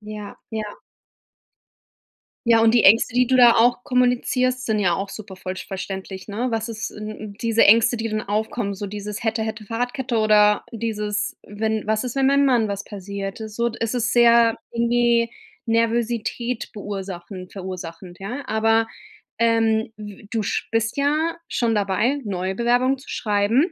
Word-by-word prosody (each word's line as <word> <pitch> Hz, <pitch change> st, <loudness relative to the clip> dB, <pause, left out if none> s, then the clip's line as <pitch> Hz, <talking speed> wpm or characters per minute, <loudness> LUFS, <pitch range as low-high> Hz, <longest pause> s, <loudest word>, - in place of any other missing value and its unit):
Ja, 210 Hz, -1 st, -8 dB
ja. 220 Hz, -1 st, -3 dB, 1.8 s
Ja, 230 Hz, -1 st, +6 dB
und 225 Hz, +1 st, +4 dB
die 235 Hz, -, +5 dB
Ängste, 225 Hz, +4 st, +5 dB
die 250 Hz, 0 st, +4 dB
du 260 Hz, +1 st, +2 dB
da 240 Hz, -2 st, +8 dB
auch 245 Hz, +2 st, +3 dB
kommunizierst, 250 Hz, 0 st, +1 dB
sind 220 Hz, -1 st, +1 dB
ja 185 Hz, -4 st, +2 dB
auch 195 Hz, +2 st, -3 dB
super 200 Hz, -2 st, -9 dB
vollsch 185 Hz, 0 st, -6 dB
verständlich, 190 Hz, -1 st, -6 dB
ne? 230 Hz, +5 st, -2 dB
Was 225 Hz, 0 st, -2 dB
ist 225 Hz, 0 st, -4 dB
sind 215 Hz, 0 st, -7 dB
'n 215 Hz, -1 st, -8 dB
diese 230 Hz, -1 st, +3 dB
Ängste, 230 Hz, +3 st, +5 dB
die 225 Hz, 0 st, -2 dB
dann 215 Hz, -1 st, -2 dB
aufkommen, 210 Hz, 0 st, -2 dB
so 205 Hz, +1 st, -5 dB
dieses: 205 Hz, +1 st, -6 dB
„Hätte 220 Hz, 0 st, 0 dB
hätte 220 Hz, -1 st, -4 dB
Fahrradkette,“ 245 Hz, +3 st, -2 dB
oder 210 Hz, -1 st, +4 dB
dieses: 215 Hz, -2 st, -2 dB
„Wenn 215 Hz, +1 st, -3 dB
was 220 Hz, +1 st, +1 dB
ist, 250 Hz, 0 st, -5 dB
wenn 270 Hz, -1 st, +3 dB
meinem 280 Hz, +1 st, +4 dB
Mann 245 Hz, -5 st, +3 dB
was 200 Hz, 0 st, -4 dB
passiert,“ 200 Hz, 0 st, -6 dB
so 235 Hz, +2 st, -1 dB
d 230 Hz, -, -10 dB
es 230 Hz, +2 st, -1 dB
ist 230 Hz, -2 st, 0 dB
sehr 235 Hz, -1 st, +5 dB
irgendwie 235 Hz, 0 st, +2 dB, 0.3 s
Nervosität 230 Hz, +1 st, -1 dB
verursachend 190 Hz, -3 st, -7 dB
verursachend, 180 Hz, -2 st, -8 dB
ja? 245 Hz, +9 st, -5 dB
Aber, 225 Hz, +1 st, +2 dB, 0.5 s
ähm, 225 Hz, -1 st, +2 dB
w 205 Hz, -1 st, -10 dB
du 220 Hz, -2 st, -1 dB
sch -, -, -2 dB
bist 225 Hz, +1 st, 0 dB
ja 305 Hz, +4 st, +1 dB
schon 235 Hz, -2 st, 0 dB
dabei, 210 Hz, +7 st, +1 dB
neue 190 Hz, -1 st, -2 dB
Bewerbungen 245 Hz, +5 st, +2 dB
zu -, -, -15 dB
schreiben 220 Hz, -, +1 dB
220 Hz, 165 wpm, -22 LUFS, 205-235 Hz, 1.8 s, da